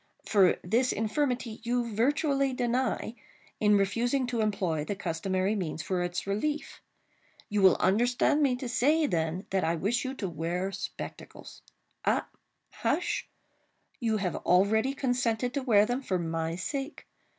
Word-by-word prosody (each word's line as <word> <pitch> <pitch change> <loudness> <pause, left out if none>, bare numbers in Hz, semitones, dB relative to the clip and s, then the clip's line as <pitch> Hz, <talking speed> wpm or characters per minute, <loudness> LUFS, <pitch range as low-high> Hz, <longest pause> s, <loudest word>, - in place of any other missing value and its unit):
For, 195 -4 +4
this 235 +8 +2
infirmity 235 +1 -1
you 235 -1 -1
virtually 275 +3 +1
deny, 245 -2 -1 0.5
in 210 -1 +4
refusing 235 +7 +1
to 240 -2 -1
employ 185 -8 0
the 205 - -3
customary 185 +2 -1
means 165 -6 -3
for 180 +2 -1
its 175 0 -2
relief. 290 +10 -2 0.7
You 205 -1 +1
will 190 -2 +7
understand 245 +9 +2
me 270 -4 +3
to 250 +1 -5
say, 295 +6 +3
then, 165 - -1
that 190 -1 +1
I 165 - +1
wish 210 +9 0
you 265 0 -4
to 200 - -3
wear 175 +3 -2
spectacles;—ah, - - -5 0.5
hush!—you 225 -4 -4
have 185 -5 -2
already 220 +8 +2
consented 245 -2 0
to 280 - -1
wear 215 -5 +4
them, 245 +4 -2
for 190 -8 -1
my 165 -1 -2
sake. 275 - -5
220 Hz, 140 wpm, -29 LUFS, 185-250 Hz, 0.7 s, will